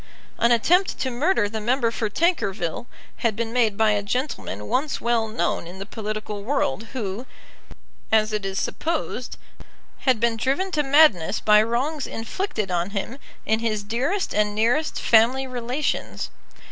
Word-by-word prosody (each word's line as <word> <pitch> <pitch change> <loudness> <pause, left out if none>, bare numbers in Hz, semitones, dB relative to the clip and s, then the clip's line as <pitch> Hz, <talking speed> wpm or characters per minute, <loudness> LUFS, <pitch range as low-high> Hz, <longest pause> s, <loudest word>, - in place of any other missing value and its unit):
An 235 - +4
attempt 355 - +3
to 260 - -1
murder 260 - +2
the 220 +1 -5
member 235 +1 +1
for 220 -2 -2
Tankerville 210 - 0 0.3
had 225 -3 0
been 230 0 -3
made 225 -5 +2
by 220 -1 +4
a 205 -1 +1
gentleman 200 - -3
once 280 +3 0
well 235 -1 +1
known 175 -5 -1
in 180 +2 -9
the 195 - -6
political 215 -1 -5
world, 225 - -1
who, 225 0 -4 0.8
as 215 0 +3
it 210 -1 -1
is 195 0 -2
supposed, 315 -6 -3 0.6
had 255 -5 +2
been 230 0 +1
driven 275 +11 0
to 305 - +1
madness 270 - +4
by 210 0 +5
wrongs 260 +7 -1
inflicted 225 - -3
on 175 +1 0
him 210 +6 -4 0.3
in 220 +1 +2
his 215 -3 -1
dearest 260 - -1
and 210 0 +1
nearest 240 +9 +1
family 240 +4 +4
relations. 255 +3 -3
230 Hz, 155 wpm, -24 LUFS, 210-265 Hz, 0.8 s, by